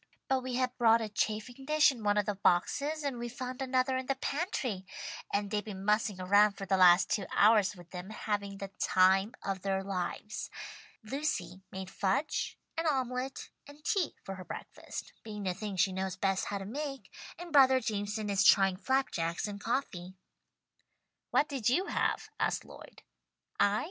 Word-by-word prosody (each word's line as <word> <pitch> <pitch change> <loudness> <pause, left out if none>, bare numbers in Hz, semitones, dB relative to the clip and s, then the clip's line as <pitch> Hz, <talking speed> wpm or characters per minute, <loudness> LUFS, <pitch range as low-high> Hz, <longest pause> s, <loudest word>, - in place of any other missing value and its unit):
But 265 -1 +1
we 255 -1 -4
had 255 0 0
brought 230 -1 +6
a 220 -2 -3
chafing 220 +5 -2
dish 305 +1 +5
in 245 -4 -9
one 205 0 +2
of 205 - +2
the 210 - 0
boxes, 285 - +1
and 270 -4 -2
we 240 0 -4
found 255 +2 -6
another 260 0 +1
in 260 0 -4
the 275 - +1
pantry, 270 - -2 0.5
and 200 0 -1
they've 210 -1 0
been 195 -3 -7
mussing 210 -2 +1
around 205 +3 +5
for 200 0 -7
the 190 0 +2
last 180 -1 +6
two 200 -3 0
hours 210 -1 +5
with 175 -1 -14
them, 180 +1 -7
having 205 -2 -3
the 195 0 -6
time 190 +4 +4
of 195 -1 -2
their 195 0 -1
lives. 195 +2 -4 0.5
Lucy 215 - -3
made 190 0 -6
fudge 200 +11 -1 0.2
and 330 0 -1
omelette 260 -2 -2 0.2
and 290 +1 -15
tea 395 -7 +1
for 195 - -5
her 185 - -7
breakfast, - - -8
being 210 -2 -7
the 185 -2 0
things 195 -1 -2
she 190 - +2
knows 190 0 -2
best 195 0 0
how 205 - -3
to 195 - -6
make, 275 +5 -5 0.2
and 345 -2 -9
brother 265 -2 +7
Jameson 210 -2 -2
is 200 -1 +2
trying 195 -2 +5
flap 265 +6 +1
jacks 170 +3 -1
and 200 -1 -7
coffee." 190 -7 -3 1.1
"What 295 - +3
did 260 -6 0
you 355 +10 +2
have?" - - -1
asked - - 0
Lloyd. - - -13 0.6
"I? 205 +1 +4
210 Hz, 180 wpm, -31 LUFS, 195-260 Hz, 1.1 s, brother